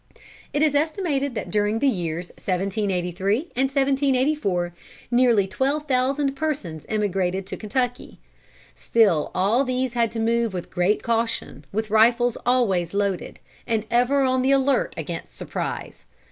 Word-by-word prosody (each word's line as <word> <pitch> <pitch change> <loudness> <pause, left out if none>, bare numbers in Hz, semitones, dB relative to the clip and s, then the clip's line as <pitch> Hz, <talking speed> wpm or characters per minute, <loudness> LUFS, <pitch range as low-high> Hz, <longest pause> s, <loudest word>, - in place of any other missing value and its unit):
It 290 - +1
is 305 -2 +3
estimated 290 -3 0
that - - -4
during 210 +1 +1
the 280 - +2
years 175 -6 -2
1783 195 - -1
and 265 +2 +2
1784 270 - +1 0.4
nearly 240 -5 +4
twelve 275 +10 -1
thousand 270 +1 +1
persons 265 - -3
emigrated 195 -3 0
to 195 - -5
Kentucky. 245 +3 -3 0.6
Still 200 -10 +2
all 210 +8 +3
these 255 -1 -1
had 235 -2 +1
to 230 - -3
move 230 -2 +1
with 175 - -6
great 180 +4 +1
caution, 230 - -2
with 215 +1 -3
rifles 235 +2 +4
always 200 -8 +2
loaded, 200 -3 -1 0.3
and 225 -2 0
ever 250 +4 +3
on 260 -1 +2
the 260 - +1
alert 275 -1 +2
against 165 +1 -6
surprise. - - -5
230 Hz, 135 wpm, -23 LUFS, 195-265 Hz, 0.6 s, nearly